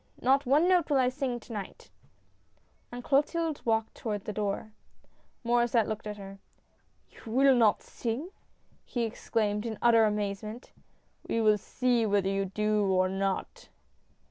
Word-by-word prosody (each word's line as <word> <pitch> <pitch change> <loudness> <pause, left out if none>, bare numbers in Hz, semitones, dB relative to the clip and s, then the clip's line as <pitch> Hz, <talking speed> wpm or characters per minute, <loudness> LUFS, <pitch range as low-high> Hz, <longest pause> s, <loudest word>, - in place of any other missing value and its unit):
Not 270 +1 +2
one 295 +7 +4
note 360 -4 +3
will 285 - +3
I 255 -1 +3
sing 255 -2 -3
to 230 - -11
night! 205 -3 -8 0.5
" - - -40
And 245 0 -7
Clotilde 305 +3 0
walked 225 -1 0
toward 210 -3 -4
the 210 - -4
door. 210 +1 -3 0.7
Maur^sset 240 -1 +2
looked 215 0 -5
at 210 0 -5
her. 195 -1 -10 0.4
" - - -41
You 225 - -11
will 270 +3 +5
not 230 -4 +3
sing! 255 +10 -4 0.3
" - - -36
he 240 - -3
exclaimed 215 -2 -1
in 225 -2 -4
utter 230 -1 +5
amaze 205 -2 -1
ment. 220 +4 -9 0.6
"We 230 - 0
will 215 -2 +4
see 245 +1 0
whether 200 -2 +1
you 195 0 0
do 210 +2 0
or 185 0 +2
not." 195 0 -3
225 Hz, 165 wpm, -29 LUFS, 210-250 Hz, 0.7 s, will